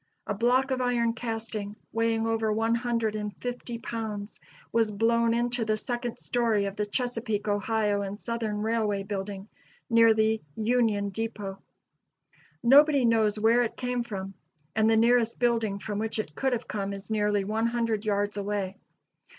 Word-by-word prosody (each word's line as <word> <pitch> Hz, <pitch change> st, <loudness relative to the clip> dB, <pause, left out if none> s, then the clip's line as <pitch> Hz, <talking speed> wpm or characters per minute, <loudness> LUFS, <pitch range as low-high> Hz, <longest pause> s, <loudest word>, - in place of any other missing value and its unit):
A -, -, -2 dB
block 255 Hz, +3 st, +2 dB
of 260 Hz, -1 st, 0 dB
iron 240 Hz, -2 st, +1 dB
casting, 225 Hz, -3 st, -4 dB, 0.2 s
weighing 225 Hz, 0 st, +1 dB
over 225 Hz, -1 st, +1 dB
one 225 Hz, +2 st, +1 dB
hundred 230 Hz, -2 st, 0 dB
and 210 Hz, -1 st, -4 dB
fifty 245 Hz, -1 st, -5 dB
pounds, 220 Hz, -3 st, -5 dB, 0.3 s
was 225 Hz, -2 st, +2 dB
blown 230 Hz, +2 st, +2 dB
into 240 Hz, 0 st, 0 dB
the 215 Hz, -1 st, 0 dB
second 240 Hz, +1 st, -3 dB
story 230 Hz, -4 st, +1 dB
of 195 Hz, 0 st, -4 dB
the 210 Hz, -1 st, -2 dB
Chesapeake, 230 Hz, -2 st, -2 dB
Ohio 205 Hz, 0 st, +1 dB
and 200 Hz, +1 st, -5 dB
Southern 220 Hz, -3 st, -2 dB
Railway 215 Hz, -3 st, 0 dB
building, 195 Hz, 0 st, -5 dB, 0.4 s
near 230 Hz, -1 st, +6 dB
the 220 Hz, 0 st, +2 dB
Union 220 Hz, -3 st, +1 dB
Depot. 205 Hz, -2 st, -4 dB, 1.0 s
Nobody 280 Hz, +2 st, +6 dB
knows 220 Hz, -2 st, +3 dB
where 225 Hz, +3 st, +4 dB
it 235 Hz, -2 st, -2 dB
came 250 Hz, -1 st, -1 dB
from, 195 Hz, -4 st, -5 dB, 0.4 s
and 220 Hz, 0 st, +3 dB
the 225 Hz, -, +4 dB
nearest 235 Hz, 0 st, +3 dB
building 230 Hz, -4 st, +1 dB
from 205 Hz, 0 st, -4 dB
which 220 Hz, +1 st, -2 dB
it 215 Hz, -8 st, -3 dB
could 265 Hz, -, 0 dB
have 235 Hz, -, -3 dB
come 200 Hz, -1 st, -3 dB
is 200 Hz, +2 st, -8 dB
nearly 210 Hz, -2 st, +1 dB
one 220 Hz, +3 st, 0 dB
hundred 230 Hz, -3 st, -1 dB
yards 205 Hz, -1 st, 0 dB
away. 200 Hz, -1 st, -2 dB
220 Hz, 160 wpm, -28 LUFS, 205-235 Hz, 1.0 s, near